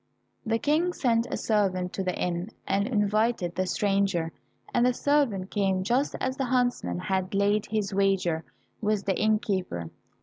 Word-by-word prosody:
The 225 Hz, 0 st, +2 dB
King 315 Hz, +8 st, +1 dB
sent 230 Hz, -5 st, +1 dB
a -, -, -2 dB
servant 185 Hz, -4 st, 0 dB
to 195 Hz, -, -2 dB
the 180 Hz, -1 st, -2 dB
inn, 175 Hz, +2 st, -1 dB, 0.2 s
and 200 Hz, +1 st, +1 dB
invited 215 Hz, -4 st, +1 dB
the 185 Hz, 0 st, -1 dB
stranger, 195 Hz, -4 st, +1 dB, 0.4 s
and 240 Hz, -, +3 dB
the 250 Hz, 0 st, +3 dB
servant 250 Hz, -12 st, +1 dB
came 190 Hz, -2 st, +1 dB
just 250 Hz, +8 st, +1 dB
as 260 Hz, 0 st, -2 dB
the 270 Hz, -, 0 dB
huntsman 245 Hz, -, 0 dB
had 190 Hz, -, -2 dB
laid 205 Hz, +1 st, +2 dB
his 210 Hz, -2 st, -1 dB
wager 190 Hz, -4 st, +1 dB, 0.4 s
with 210 Hz, -2 st, 0 dB
the 195 Hz, -2 st, +1 dB
innkeeper. 195 Hz, -, 0 dB
200 Hz, 160 wpm, -27 LUFS, 185-230 Hz, 0.4 s, and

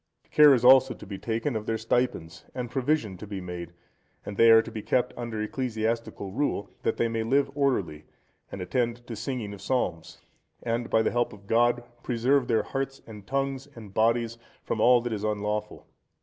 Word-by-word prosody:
Care 150 Hz, -2 st, +8 dB
is 125 Hz, -1 st, -1 dB
also 130 Hz, 0 st, +7 dB
to -, -, -12 dB
be 100 Hz, -1 st, -7 dB
taken 115 Hz, +4 st, -2 dB
of 110 Hz, 0 st, -4 dB
their 115 Hz, -, 0 dB
stipends, 110 Hz, -8 st, -1 dB
and 125 Hz, -2 st, -4 dB
provision 130 Hz, -7 st, 0 dB
to 105 Hz, -, -9 dB
be 100 Hz, -1 st, -5 dB
made, 90 Hz, -1 st, -7 dB, 0.5 s
and 100 Hz, -, -6 dB
they 115 Hz, +3 st, +6 dB
are 115 Hz, 0 st, +8 dB
to 115 Hz, -, -9 dB
be 110 Hz, -1 st, -5 dB
kept 125 Hz, +4 st, 0 dB
under 115 Hz, -3 st, -5 dB
ecclesiastical 115 Hz, -4 st, -3 dB
rule, 130 Hz, -2 st, -2 dB
that -, -, -1 dB
they 115 Hz, -, +2 dB
may 115 Hz, 0 st, -2 dB
live 135 Hz, +4 st, +1 dB
orderly, 100 Hz, -, -1 dB, 0.5 s
and 95 Hz, -, -5 dB
attend 120 Hz, +4 st, -1 dB
to 120 Hz, -, -6 dB
singing 110 Hz, -2 st, -4 dB
of 100 Hz, -, -10 dB
psalms, 95 Hz, -9 st, -2 dB, 0.5 s
and, 115 Hz, 0 st, -2 dB
by 110 Hz, -, +3 dB
the -, -, +1 dB
help 120 Hz, -1 st, 0 dB
of 100 Hz, -1 st, -14 dB
God, 120 Hz, +3 st, +2 dB, 0.2 s
preserve 125 Hz, +2 st, +1 dB
their 115 Hz, -, +2 dB
hearts 135 Hz, 0 st, -4 dB
and 105 Hz, -3 st, -12 dB
tongues 135 Hz, 0 st, -2 dB
and 105 Hz, -4 st, -11 dB
bodies 115 Hz, +1 st, +1 dB, 0.2 s
from 110 Hz, -, -2 dB
all 125 Hz, +1 st, +6 dB
that 120 Hz, -1 st, -3 dB
is 105 Hz, -1 st, -4 dB
unlawful. 105 Hz, 0 st, -2 dB
115 Hz, 190 wpm, -27 LUFS, 105-125 Hz, 0.5 s, Care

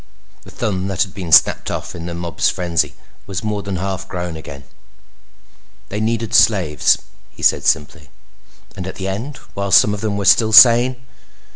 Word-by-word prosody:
The -, -, -15 dB
thumb 95 Hz, -5 st, -3 dB
that 95 Hz, -2 st, 0 dB
had 95 Hz, -, -10 dB
been 90 Hz, -5 st, -7 dB
snapped -, -, +4 dB
off -, -, -5 dB
in 85 Hz, 0 st, -8 dB
the 85 Hz, -, -6 dB
mob's 85 Hz, -1 st, -1 dB
frenzy 85 Hz, -3 st, -2 dB, 0.3 s
was 95 Hz, 0 st, -5 dB
more 105 Hz, -1 st, -3 dB
than 100 Hz, -1 st, -5 dB
half 95 Hz, +1 st, -4 dB
grown 90 Hz, -3 st, -5 dB
again. 70 Hz, -3 st, -10 dB, 1.3 s
"They 105 Hz, -, -4 dB
needed 115 Hz, 0 st, -2 dB
slaves," 90 Hz, -9 st, +3 dB, 0.3 s
he -, -, -14 dB
said -, -, +2 dB
simply. 75 Hz, -1 st, -1 dB, 0.7 s
"And 95 Hz, -2 st, -7 dB
at 95 Hz, -, -7 dB
the 95 Hz, -, -5 dB
end, 115 Hz, +9 st, -5 dB, 0.2 s
while 100 Hz, 0 st, -4 dB
some 105 Hz, +2 st, +5 dB
of 105 Hz, -, -6 dB
them 105 Hz, -2 st, -2 dB
were 100 Hz, -, -3 dB
still 110 Hz, +3 st, +4 dB
sane?" 120 Hz, +3 st, +7 dB
95 Hz, 175 wpm, -18 LUFS, 90-105 Hz, 1.3 s, sane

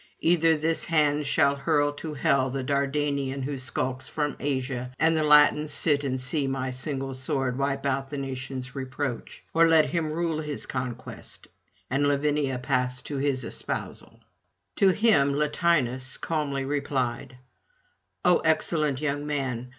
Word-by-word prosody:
Either 165 Hz, -1 st, +4 dB
this 160 Hz, +2 st, +1 dB
hand 150 Hz, -3 st, +2 dB
shall 145 Hz, -1 st, +3 dB
hurl 145 Hz, 0 st, +1 dB
to 150 Hz, +1 st, -6 dB
hell 140 Hz, -3 st, +2 dB
the 135 Hz, 0 st, -3 dB
Dardanian 140 Hz, 0 st, -1 dB
who 140 Hz, +2 st, -3 dB
skulks 130 Hz, -1 st, -2 dB
from 150 Hz, -2 st, -2 dB
Asia, 130 Hz, -3 st, -2 dB
and 160 Hz, 0 st, +3 dB
the 160 Hz, -, +2 dB
Latins 150 Hz, 0 st, +5 dB
sit 145 Hz, -1 st, +1 dB
and 130 Hz, -2 st, -1 dB
see 135 Hz, +2 st, 0 dB
my 130 Hz, -1 st, -2 dB
single 135 Hz, +1 st, -4 dB
sword 130 Hz, -1 st, -1 dB
wipe 135 Hz, +1 st, -1 dB
out 135 Hz, 0 st, -1 dB
the 145 Hz, -, -5 dB
nation's 130 Hz, -1 st, -5 dB
reproach; 130 Hz, -1 st, -5 dB
or 165 Hz, 0 st, +5 dB
let 160 Hz, -2 st, +5 dB
him 165 Hz, -3 st, -1 dB
rule 165 Hz, -1 st, -1 dB
his 150 Hz, -2 st, -4 dB
conquest, 125 Hz, -2 st, -6 dB, 0.4 s
and 140 Hz, +5 st, +1 dB
Lavinia 145 Hz, -2 st, +1 dB
pass 125 Hz, -1 st, -1 dB
to 145 Hz, -, -5 dB
his 135 Hz, -2 st, 0 dB
espousal.' -, -, -6 dB, 0.6 s
To 195 Hz, -, +5 dB
him 180 Hz, -9 st, +3 dB
Latinus 145 Hz, -4 st, +1 dB
calmly 145 Hz, -5 st, -2 dB
replied: 135 Hz, -3 st, -2 dB, 0.9 s
'O 180 Hz, -1 st, +5 dB
excellent 155 Hz, -3 st, +1 dB
young 145 Hz, 0 st, -2 dB
man! 130 Hz, -4 st, -2 dB
140 Hz, 145 wpm, -26 LUFS, 130-150 Hz, 0.9 s, Latins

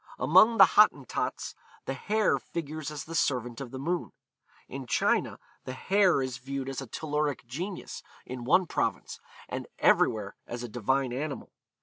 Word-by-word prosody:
Among 230 Hz, +1 st, +5 dB
the -, -, +10 dB
Hottentots, 145 Hz, -, +2 dB, 0.3 s
the 135 Hz, -, -2 dB
hare 210 Hz, +9 st, +1 dB
figures 155 Hz, -2 st, -5 dB
as 150 Hz, -2 st, -6 dB
the 165 Hz, -, -9 dB
servant 125 Hz, -5 st, 0 dB
of 130 Hz, -, -6 dB
the 130 Hz, -, -7 dB
moon. 170 Hz, +6 st, -2 dB, 0.5 s
In 135 Hz, -1 st, -7 dB
China, -, -, +1 dB, 0.3 s
the 130 Hz, -, -5 dB
hare 185 Hz, +1 st, +3 dB
is 130 Hz, 0 st, -4 dB
viewed 135 Hz, +1 st, -4 dB
as 135 Hz, 0 st, -4 dB
a 135 Hz, -, -7 dB
telluric 150 Hz, +1 st, -2 dB
genius 175 Hz, +11 st, -6 dB, 0.2 s
in 125 Hz, -1 st, -6 dB
one 180 Hz, +9 st, +4 dB
province, -, -, -2 dB, 0.3 s
and -, -, -5 dB
everywhere 105 Hz, -3 st, +2 dB
as 120 Hz, 0 st, -5 dB
a -, -, -4 dB
divine 125 Hz, +3 st, 0 dB
animal. 140 Hz, +2 st, -4 dB
135 Hz, 155 wpm, -29 LUFS, 130-160 Hz, 0.5 s, the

